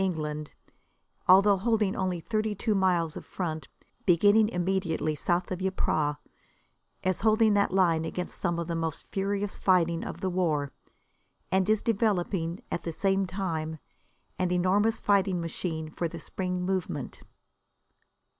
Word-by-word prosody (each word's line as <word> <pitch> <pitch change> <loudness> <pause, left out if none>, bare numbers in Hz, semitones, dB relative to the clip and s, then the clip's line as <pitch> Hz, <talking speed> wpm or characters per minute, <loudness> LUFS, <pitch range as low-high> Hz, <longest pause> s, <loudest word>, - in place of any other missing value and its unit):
England, 155 -5 -2 0.8
although 195 +2 +7
holding 215 -1 +1
only 185 -2 -1
thirty 215 +3 -1
two 215 +2 0
miles 180 -5 +1
of - - -7
front, 160 -4 -4 0.4
beginning 205 +4 +5
immediately 180 -5 -1
south 175 +5 -1
of 185 0 -3
Ypres, 155 -5 0 0.9
is 185 -1 0
holding 220 -1 +4
that 200 -2 +2
line 175 -4 +3
against 175 +2 -5
some 170 -1 0
of 170 - -2
the 170 - -3
most 165 -2 -3
furious 200 +1 -2
fighting 170 -3 +2
of - - -6
the 190 - -1
war, 155 -6 0 0.8
and 190 +1 +2
is 215 -1 +2
developing, 190 -6 0
at - - -2
the 165 - -4
same 195 +3 +1
time, 165 -5 -3 0.6
an 185 -1 +1
enormous 195 +5 +2
fighting 195 -3 +2
machine 160 -1 -4
for 170 - -2
the 170 - -8
spring 180 +2 -3
movement. 185 -1 -3
185 Hz, 140 wpm, -28 LUFS, 165-195 Hz, 0.9 s, although